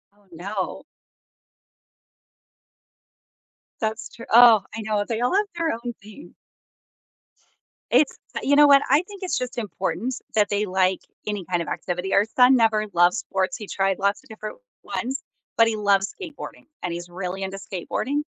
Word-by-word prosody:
Oh, 205 -1 -28
no. 190 +3 -4 3.0
That's 220 0 -3
true 230 - -11
oh, 230 -2 +8
I 225 - -4
know. 215 -1 0
They 230 -1 -2
all 250 +10 +1
have 415 +1 +3
their 330 -1 0
own 240 +1 -5
thing. 215 +9 -13 1.6
It's 300 - +3 0.2
you 285 +1 +3
know 295 0 +8
what? 280 -1 +7
I 290 +6 +4
think 400 -2 -10
it's 365 - -1
just 250 -1 -4
important 220 +4 -3 0.2
that 210 -1 +3
they 205 +1 0
like 185 -1 +1 0.3
any 205 -4 -3
kind 175 -1 +1
of 170 - -5
activity. 180 +1 -3
Our 200 - +4
son 255 +1 +7
never 220 -2 +3
loves 175 +1 +4
sports, 190 -2 -2
he 210 - -8
tried 195 -1 0
lots 200 +5 0
of 265 - -22
different 215 -1 -7 0.3
ones, 260 +3 -3 0.4
but 230 0 +6
he 225 - 0
loves 200 -2 +2
skateboarding, 335 -7 -9 0.2
and 175 -1 -3
he's 175 +1 -6
really 185 +1 -5
into 195 +1 -4
skateboarding. 200 - -3
215 Hz, 160 wpm, -24 LUFS, 190-250 Hz, 3.0 s, oh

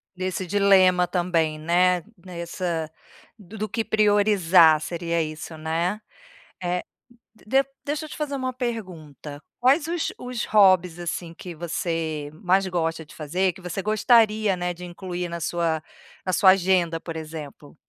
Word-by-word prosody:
Nesse 185 0 -3
dilema 185 -2 +4
também, 170 -3 0
né, 175 +2 +2 0.2
nessa 170 -2 -4 0.5
do 205 +1 -12
do 215 +1 -3
que 225 -2 -2
priorizar, 200 -6 +5
seria 170 0 -2
isso, 155 +1 -6
né. 165 +6 -2 0.6
Eh, 180 0 -1 0.5
d 265 +6 +1
de - - -27 0.2
deixa 300 +2 -3
eu 310 - -11
te - - -9
fazer 295 -2 -3
uma 255 -1 -3
pergunta: 170 - -6 0.2
quais 280 +6 +3
os 340 -1 -2
os 250 -2 -4
hobbies, 185 -5 +4
assim, 170 0 -4
que 175 +1 -9
você 160 -2 -3
mais 190 +4 +1
gosta 165 -2 -2
de 150 - -16
fazer, 180 +5 -1
que 185 - -14
você 180 +2 -4
gostaria, 215 -1 +3
né, 180 0 -2
de 180 +1 -9
incluir 175 0 -5
na 170 - -5
sua 165 -1 -1 0.4
na 185 - -1
sua 185 +2 +7
agenda, 180 -3 +2
por 165 0 -7
exemplo? 155 -2 -8
180 Hz, 150 wpm, -24 LUFS, 165-205 Hz, 0.6 s, sua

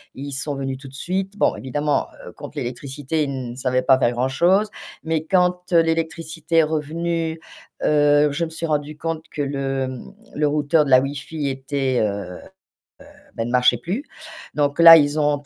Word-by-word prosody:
ils 140 +1 -7
sont 140 +1 -3
venus 135 -1 -4
tout 135 0 -12
de 135 - -13
suite. 190 +7 -3
Bon - - +1
évidemment, 145 +3 -1 0.2
heu, - - -9
contre - - -11
l'électricité, 140 +5 -3
ils 130 -3 -5
savaient 130 -1 0
pas 130 0 +4
faire 120 -2 +2
grand-chose, 175 - +2 0.3
mais 160 -1 -1
quand, 180 0 +1
heu, 165 - +7
l'électricité 165 0 -2
est - - +6
revenue, 160 +2 -2 0.5
heu, 145 0 +4
je 165 +4 -1
me - - -7
suis 165 +1 -5
rendue 150 -1 -2
compte 160 0 -4
que 145 - -4
le, 135 -1 -2
hem, 130 +4 -7 0.2
le 150 0 +1
routeur 150 +1 +2
de - - -4
la 130 0 +6
wifi 140 +1 -4
était, 135 -1 -1
heu 110 - +2 0.3
heu, - - -12 1.0
bah 115 - -2
il 120 - -4
marchait 125 -1 +4
plus. 185 - -4 0.5
Donc 145 +2 0
là, 165 0 +11
ils 145 0 +2
ont 145 -1 +1
145 Hz, 180 wpm, -21 LUFS, 135-165 Hz, 1.0 s, là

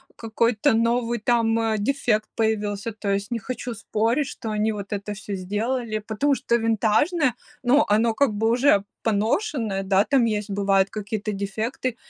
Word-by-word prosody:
какой-то 225 0 +1
новый 235 +1 +1
там, 230 0 +2
э, 225 -1 0
дефект 220 -2 0
появился. 215 -1 -1
То 215 -1 -5
есть 200 +2 -1
не 235 - -1
хочу 245 +2 -5
спорить, 225 +5 0
что 230 - -6
они 215 +1 +1
вот 205 0 -6
это 205 0 -5
всё 200 0 -6
сделали, 215 +4 -2
потому 275 +6 +1
что 235 - +1
винтажное, 230 - +2 0.3
ну, 265 +4 +4
оно 220 +2 +3
как 280 +3 +2
бы 220 +2 +1
уже 240 -4 +4 0.2
поношенное, 220 - 0
да, 195 +1 +3
там 245 +2 +2
есть, 210 -2 -2
бывают 195 -1 +2
какие-то 215 0 -4
дефекты, 215 +5 -3
220 Hz, 160 wpm, -24 LUFS, 205-240 Hz, 0.3 s, ну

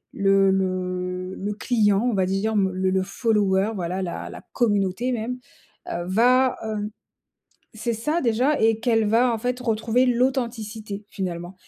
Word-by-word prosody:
le 195 -1 +4
le 185 -1 -2
le 205 +2 -3
client, 210 -3 +2
on 245 - +1
va 190 -2 +2
dire, 195 +4 -1
m 195 -2 +2
le 185 0 0
le 190 0 +1
follower, 200 -1 +1
voilà, 185 0 -3
la 175 -2 -5
la - - -9
communauté 205 +1 +1
même, 245 +1 -3 0.5
heu, 175 - -3
va, 250 +6 +3
heu 210 -1 -3 0.9
c'est 235 +2 -2
ça, 300 +10 -1
déjà, 250 +5 +2
et 225 0 +3
qu'elle 225 -2 +2
va, 235 +3 +3
en 225 - -3
fait, 250 +2 -2
retrouver 230 +1 +1
l'authenticité 235 -5 -1
finalement 175 -1 -5
215 Hz, 155 wpm, -24 LUFS, 190-235 Hz, 0.9 s, le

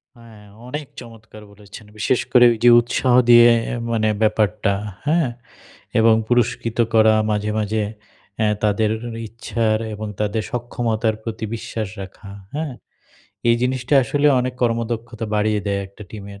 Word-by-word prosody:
হ্যাঁ 115 -3 -16 0.2
অনেক 150 +4 -5
চমৎকার 110 -2 -13
বলেছেন 100 +1 -13
বিশেষ 110 +4 +1 0.2
ওইযে 120 -1 +6
উৎসাহ 120 +1 +1
দিয়ে 120 0 +8 0.2
আ - - -2 0.2
মানে 110 -1 +1
ব্যাপারটা 105 -1 +1 0.3
হ্যাঁ? 155 -2 +2 0.7
এবং 110 0 +5
পুরস্কৃত 120 -1 0
করা 110 -1 +5 0.2
মাঝে, 105 0 -1
মাঝে 110 0 -1 0.6
অ্যা 110 - +2 0.2
তাদের 105 +1 +1 0.4
ইচ্ছার 110 -1 -1
এবং 105 +1 -6
তাদের 105 +1 -1
সক্ষমতার 115 -2 -1
প্রতি 110 -1 -5
বিশ্বাস 110 -1 -5
রাখা, 95 +1 -11 0.3
হ্যাঁ? 150 -3 -3 0.8
এই 115 - +6
জিনিসটা 125 +1 0
আসলে 145 +5 +1
অনেক 125 0 -3
কর্মদক্ষতা 115 -1 -2
বাড়িয়ে 105 0 +1
দেয় 100 -1 0
একটা 100 +2 -14
টিমের 100 -2 -10
110 Hz, 130 wpm, -20 LUFS, 105-120 Hz, 0.8 s, দিয়ে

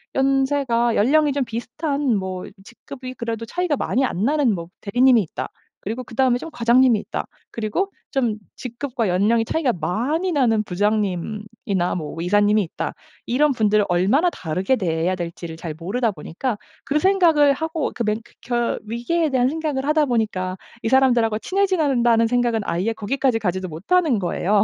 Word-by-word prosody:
연세가 270 -3 +2
연령이 290 +6 +3
좀 280 -2 0
비슷한 255 +3 -2
뭐 185 -1 -4 0.2
직급이 255 +3 -10
그래도 230 -2 -4
차이가 355 +4 -1
많이 260 - 0
안 200 -7 -1
나는 275 -4 +2
뭐 170 -2 -6
대리님이 245 +3 +4
있다. 175 - -5 0.3
그리고 225 +5 -5
그다음에 245 +1 +1
좀 325 - -7
과장님이 240 -1 +4
있다. - - -4 0.3
그리고 230 - -2 0.2
좀 245 -6 +1 0.2
직급과 245 -1 -3
연령이 210 +6 +2
차이가 290 0 +1
많이 240 - -1
나는 230 -7 +2
부장님이나 205 0 -1
뭐 155 -1 -6
이사님이 205 +4 +3
있다. 165 - -4 0.3
이런 280 +4 +2
분들을 215 -3 +2
얼마나 200 - +3
다르게 185 - -1
대해야 175 -3 0
될지를 170 -1 -6
잘 165 -1 -6
모르다 215 +8 -1
보니까 200 - -4 0.3
그 295 +2 0
생각을 330 -6 +4
하고 320 +1 -2
그 240 - -2
맨크켜 235 +2 -2
위기에 240 +9 0
대한 255 -2 +2
생각을 300 -3 -2
하다 305 0 +3
보니까 200 -6 -1 0.3
'이 225 - 0
사람들하고 240 -4 +3
친해져야 375 - +1
된다.'는 235 -3 +3
생각은 240 -2 +1
아예 185 +7 0
거기까지 240 +2 0
가지도 185 -2 -2
못하는 245 - +1
거예요. 195 +3 +1
235 Hz, 375 characters per minute, -22 LUFS, 205-275 Hz, 0.3 s, 대리님이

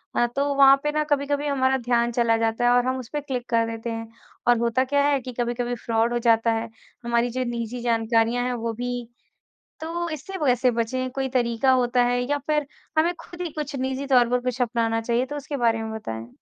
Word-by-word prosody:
अ, 240 - +3
तो 280 0 +1
वहाँ 275 -1 +8
पे 295 - 0
ना 305 0 0
कभी-कभी 285 0 0
हमारा 265 -2 +2
ध्यान 240 -1 +1
चला 230 -1 +2
जाता 225 +1 0
है 245 - +5
और 245 - +2
हम 260 - 0
उस 245 -2 -9
पे 295 - -1
क्लिक 255 -4 -4
कर 230 -1 +2
देते 225 +1 -5
हैं 225 0 -5 0.4
और 240 0 +5
होता 235 +2 +2
क्या 280 +2 +1
है 285 -2 +2
कि 250 0 -7
कभी-कभी 240 0 -1
फ्रॉड 230 +1 +1
हो 240 - +1
जाता 230 -1 +3
है, 225 0 -2 0.3
हमारी 235 0 +1
जो 255 +2 -2
निजी 235 0 -4
जानकारियाँ 230 0 +1
हैं 250 - -1
वो 230 -1 -3
भी 245 +2 -3 0.9
तो 340 +2 -3
इससे 310 +6 -6
वैसे 250 -1 +3
बचें 255 +2 -2
कोई 265 0 -2
तरीक़ा 235 +1 +2
होता 250 -1 +3
है 245 0 +1
या 290 +4 -1
फिर 300 -2 +1 0.3
हमें 335 +3 +3
खुद 350 - -12
ही 345 - -3
कुछ 300 -1 -5
निजी 265 +1 -2
तौर 250 -3 +4
पर 250 0 +2
कुछ 250 0 -3
अपनाना 230 -1 0
चाहिए? 235 +2 0
तो 290 - -6
उसके 290 0 -5
बारे 230 -2 +1
में 220 0 -5
बताएँ। 115 - -6
245 Hz, 225 wpm, -24 LUFS, 230-270 Hz, 0.9 s, वहाँ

